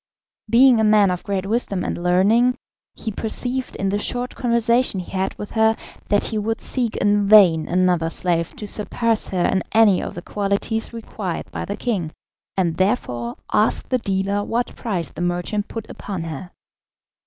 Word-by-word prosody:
Being 245 +1 +6
a - - +3
man 210 -3 +5
of 180 - -3
great 195 -2 -2
wisdom 200 -3 -1
and - - -2
learning, 205 +8 +3 0.4
he 220 - -4
perceived 245 +5 -2
in 195 - -1
the 205 +1 0
short 245 +3 -2
conversation 235 -3 +1
he 180 - -8
had 190 0 -2
with 205 - -7
her 220 0 +3 0.3
that 205 0 +2
he 220 - -2
would 225 +2 -2
seek 240 -4 -1
in 205 0 +2
vain 185 -7 +6
another 180 -3 +2
slave 170 0 -1
to 210 - -6
surpass 220 +2 -1
her 180 -2 0
in 190 - +1
any 215 -4 +5
of - - -6
the 175 - -7
qualities 205 +3 -2
required 215 -5 -5
by - - -4
the 200 - -4
king, 190 -10 -2 0.5
and 170 -4 +1
therefore 125 - -1 0.2
asked 210 +1 +1
the 255 - +2
dealer 200 -1 -1
what 235 +3 -2
price 190 -8 -3
the - - -7
merchant 175 +4 -1
put 225 -1 -7
upon 190 -5 -6
her. 165 +2 -6
205 Hz, 175 wpm, -21 LUFS, 185-225 Hz, 0.5 s, Being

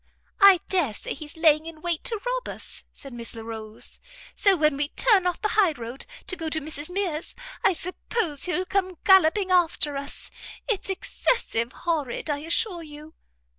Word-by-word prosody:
"I 395 -4 +8
dare 320 - +1
say - - -4
he's 300 +2 -9
laying 315 -1 +4
in 330 -1 -8
wait 345 -2 0
to 450 -3 -2
rob - - -2
us," - - -8
said 275 -2 -11
Miss 235 -1 -5
Larolles; 220 -1 -8 0.4
"so 395 -2 +4
when 305 -2 +3
we 285 +1 +1
turn 395 -3 +3
off 355 - -1
the 425 - 0
high 390 -7 +3
road, 240 - -8 0.2
to 365 - -3
go 325 -2 -4
to 315 - -1
Mrs 305 0 -6
Mears, 360 -4 -3 0.3
I - - +5
suppose 355 -2 -2
he'll 360 0 -1
come 375 -1 -1
galloping 380 0 +5
after 330 -5 +2
us. 280 +1 -7 0.4
It's 415 -4 -1
excessive 250 - 0
horrid, 305 -3 -1
I 285 - -1
assure 340 +4 -1
you." 305 0 -11
325 Hz, 170 wpm, -25 LUFS, 295-375 Hz, 0.4 s, I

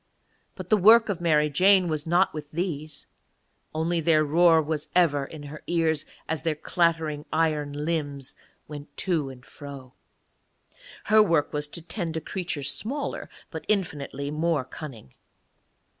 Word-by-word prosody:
But - - -9
the 215 - +6
work 220 +3 +7
of 185 -4 -2
Mary 150 -3 +3
Jane 185 +5 +4
was 155 -1 -3
not 175 +3 +3
with 150 -2 -7
these, 155 -3 -4 0.7
only 165 +2 0
their 155 -1 +3
roar 165 +2 +5
was 155 -1 -2
ever 145 -6 +3
in 150 +1 -10
her 145 +1 -9
ears 160 -3 +1 0.2
as 160 -2 -2
their 160 -1 0
clattering 160 -2 0
iron 155 -3 +1
limbs 145 -2 -3 0.3
went 145 -1 -10
to 165 -7 0
and 130 -2 -12
fro. 140 -3 -11 1.1
Her 215 +1 +5
work 165 -8 +2
was 150 0 -1
to 165 +2 -7
tend 165 -3 -3
a - - 0
creature 165 -2 -4
smaller, 235 - -2 0.2
but - - -6
infinitely 145 -8 -2
more 155 -2 0
cunning. 130 - -10
155 Hz, 145 wpm, -26 LUFS, 145-170 Hz, 1.1 s, work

